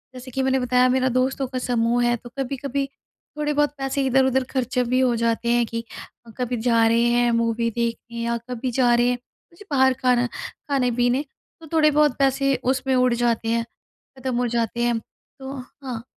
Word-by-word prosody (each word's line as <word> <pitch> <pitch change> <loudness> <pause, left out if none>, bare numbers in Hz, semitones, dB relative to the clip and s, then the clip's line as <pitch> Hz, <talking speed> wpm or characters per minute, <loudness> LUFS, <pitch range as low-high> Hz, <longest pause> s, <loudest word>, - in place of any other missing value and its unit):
जैसे 255 +1 -9
कि 265 - -1
मैंने 265 0 +2
बताया 250 0 +3
मेरा 260 0 +2
दोस्तों 260 +2 0
का 255 0 -4
समूह 240 -1 +1
है 240 0 +2
तो 240 - -12
कभी-कभी 275 +1 -2 0.5
थोड़े-बहुत 295 -1 +1
पैसे 270 0 -1
इधर-उधर 265 0 +3
खर्च 255 -1 -2
भी 255 +1 +2
हो 255 -2 +3
जाते 230 0 0
हैं 240 0 +3
कि 230 +1 -4 0.5
कभी 250 -1 -2
जा 230 -1 +3
रहे 230 +1 +3
हैं 240 0 +3
मूवी 230 0 +1
देखने 235 0 -3
या 235 0 0
कभी 250 +1 -3
जा 245 0 +3
रहे 240 0 +3
हैं 250 - 0
मुझे 340 +9 -21
बाहर 265 -2 +4
खाना 250 -1 +3
खाने-पीने 250 -1 -1 0.4
तो 320 - -11
थोड़े 305 -1 +5
बहुत 295 -3 +3
पैसे 275 0 +2 0.2
उसमें 265 0 0
उड़ 250 -1 +3
जाते 235 -1 0
हैं, 230 0 +1 0.6
ख़त्म 260 -1 -2
हो 245 0 +1
जाते 235 0 -1
हैं। 240 -1 +1 0.4
तो 265 0 -7 0.3
हाँ। 245 -4 -5
250 Hz, 180 wpm, -23 LUFS, 235-265 Hz, 0.6 s, थोड़े